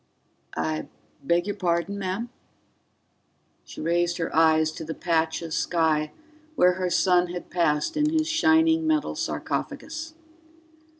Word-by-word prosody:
"I 80 -1 -2 0.3
beg 170 +5 +1
your 205 -1 -3
pardon, 185 +1 -1
ma'am?" 195 +5 -3 1.4
She - - -9
raised 170 +1 +1
her 165 - -3
eyes 160 -1 +4
to 160 - -8
the 160 0 -5
patch 165 -1 0
of 165 -1 -5
sky 155 -3 +1 0.4
where 180 -9 +5
her 185 0 -2
son 180 0 +3
had 175 0 -7
passed 150 - +1
in 300 0 +2
his 315 0 +1
shining 320 0 +3
metal 310 -2 +1
sarcophagus. 320 0 -4
175 Hz, 130 wpm, -25 LUFS, 160-260 Hz, 1.4 s, where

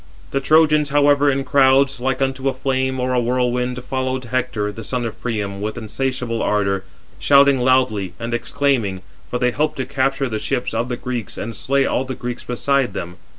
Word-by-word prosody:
The 135 - +1
Trojans, 150 +1 +4
however, 145 0 +4
in 135 0 0
crowds, 135 0 +3
like 130 +2 0
unto 135 0 -1
a 135 - -4
flame 130 0 -1
or 125 0 0
a 125 - +3
whirlwind, 125 0 0
followed 130 0 -2
Hector, 120 -4 -1
the 110 +2 -9
son 125 +2 -2
of 115 0 -6
Priam, 100 -4 -3
with 110 +1 -3
insatiable 125 0 -2
ardour, 100 -2 0 0.4
shouting 140 -1 +5
loudly, 125 -8 +1
and 120 0 -4
exclaiming; 120 -7 0 0.3
for 125 - -1
they 125 0 +1
hoped 150 +5 -1
to 130 - -2
capture 135 +1 0
the 110 -3 -3
ships 110 +3 -2
of 115 +2 -1
the 120 - -2
Greeks, 125 -4 -5
and 115 +1 -5
slay 135 +5 +1
all - - 0
the 130 0 -5
Greeks 120 0 -5
beside 130 -1 0
them. 90 -2 -6
125 Hz, 190 wpm, -20 LUFS, 115-135 Hz, 0.4 s, shouting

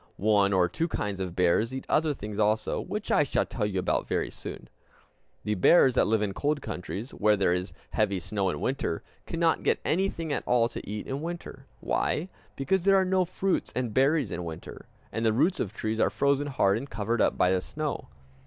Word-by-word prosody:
One 100 -1 +3
or 90 -2 +3
two 160 - -2
kinds 105 - -3
of 90 -2 -4
bears 90 +6 +2
eat 130 0 -5
other 155 0 +2
things 105 -6 -6
also, 110 +1 +1
which 210 +3 -4
I - - +5
shall 145 - +1
tell 105 -4 -2
you 100 -2 -3
about 90 - 0
very - - -1
soon. - - -8 0.8
The 105 - 0
bears 130 - +5
that - - +3
live 110 -1 +2
in 100 -2 -2
cold 145 +6 0
countries, 105 +5 -6
where 105 0 +2
there 95 -3 +2
is 90 +1 -2 0.2
heavy 100 -3 +1
snow 100 +1 -1
in - - -3
winter, 130 - -2 0.2
cannot 165 -1 +1
get - - +1
anything 165 -3 0
at - - -1
all 120 -1 +4
to - - -8
eat 105 0 -4
in 135 +2 -4
winter. 165 -5 -7
Why? 175 +5 -1 0.3
Because 180 +6 0
there 195 +1 +5
are 190 -1 +4
no 185 0 +2
fruits 185 +2 -1
and 125 -4 -2
berries 135 - +2
in 90 - -4
winter, 80 -2 -8 0.2
and 115 - -2
the 110 -1 +3
roots 165 - +2
of 95 - -2
trees 110 0 -3
are - - +4
frozen 140 +1 +1
hard 100 -7 +2
and 140 +3 -8
covered 110 +2 -1
up - - +2
by 90 - +3
the 95 -1 +1
snow. 150 +8 -4
115 Hz, 210 wpm, -28 LUFS, 100-150 Hz, 0.8 s, I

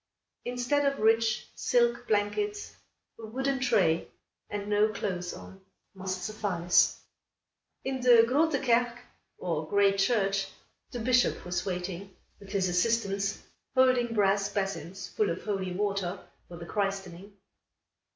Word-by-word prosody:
Instead 245 +4 0
of 275 - -8
rich 225 0 +2
silk 240 0 +1
blankets 410 - -1 0.5
a 225 - -7
wooden 265 +4 -1
tray, 175 -10 +2 0.4
and 205 0 -4
no 210 +1 +3
clothes 180 -4 -3
on, 190 0 -11 0.3
must 185 -1 -4
suffice. 195 -5 +1 0.8
In 265 -1 -3
the 240 -2 +7
Groote 285 +2 +2
Kerk, 240 0 +2 0.4
or 160 -3 -3
Great 200 -1 +3
Church, 195 -3 +1 0.4
the 250 - -6
Bishop 250 -2 +2
was 180 +1 -2
waiting, 180 +1 -5 0.2
with 200 - -13
his 195 -2 +1
assistants, 200 +1 0 0.3
holding 255 -3 +3
brass 200 -1 +2
basins 195 -2 -4
full 215 - 0
of 170 - -4
holy 195 -3 -2
water, 195 -1 -1 0.3
for 175 - -10
the 170 - -8
christening. 195 0 -4
205 Hz, 125 wpm, -29 LUFS, 190-235 Hz, 0.8 s, the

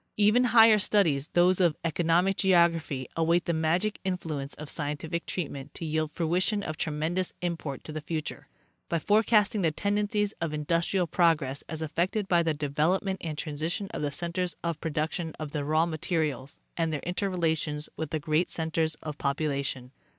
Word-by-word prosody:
Even 215 +4 +5
higher 225 -2 +7
studies, 165 -9 +2
those 180 +1 +4
of 170 -5 +3
economic 170 +3 +2
geography, 165 -8 +2
await 165 +1 +2
the 170 - 0
magic 170 +7 0
influence 160 -7 -3
of 155 - -8
scientific 155 +3 -3
treatment 145 -5 -5
to 165 - -5
yield 155 0 -1
fruition 180 +6 0
of 155 - -4
tre 155 - -2
mendous 165 +5 -1
import 165 -6 -4
to - - -8
the 155 0 -4
future, 155 0 -5 0.4
by 170 - +1
forecasting 210 +3 +3
the 165 - +3
tendencies 205 +4 0
of 160 -2 -1
industrial 170 +4 +1
progress 160 -5 +2
as 160 -1 -3
affected 185 +6 -1
by 175 -2 +4
the 165 -2 0
development 160 +7 0
and 155 -3 -4
_ - - -5
transi 155 +3 -2
tion 200 -1 -4
of - - -3
the 145 -1 -1
centers 175 +4 -3
of 170 -2 -2
production 160 +1 -2
of 155 -2 -5
the 150 -2 -2
raw 155 +3 +2
materials, 155 -5 -2 0.2
and 165 -1 0
their 150 - -2
interrelations 165 -5 -1
with 160 -2 -4
the 155 - -1
great 155 +3 +1
centers 160 -1 -1
of 150 -1 -6
population. 140 -3 -2
165 Hz, 170 wpm, -28 LUFS, 150-180 Hz, 0.4 s, higher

